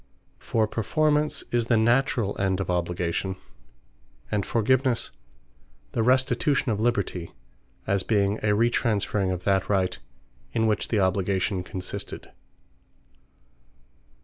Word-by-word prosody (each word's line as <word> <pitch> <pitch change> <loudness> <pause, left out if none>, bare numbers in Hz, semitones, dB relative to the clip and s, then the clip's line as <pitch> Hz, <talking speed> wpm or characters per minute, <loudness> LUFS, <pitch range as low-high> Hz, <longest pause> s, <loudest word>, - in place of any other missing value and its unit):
For 110 -1 0
Performance, 150 +8 +1
is 120 -1 +1
the 120 - +3
naturall 120 -2 +2
end 95 -1 +1
of 95 -2 -2
obligation; 90 +1 -1 1.0
and 105 - +1
Forgivenesse, 120 +2 +1 0.8
the 115 - 0
restitution 130 +2 +2
of 105 - -1
liberty; 100 -7 -1 0.5
as 100 0 +1
being 100 0 +1
a 105 -1 +1
retransferring 105 -4 +1
of 90 -1 -4
that 95 -1 +1
Right, 95 -3 +1 0.5
in 115 -1 +2
which 105 -2 +1
the 110 - +1
obligation 95 0 +1
consisted. 90 0 -6
105 Hz, 110 wpm, -26 LUFS, 95-120 Hz, 1.0 s, the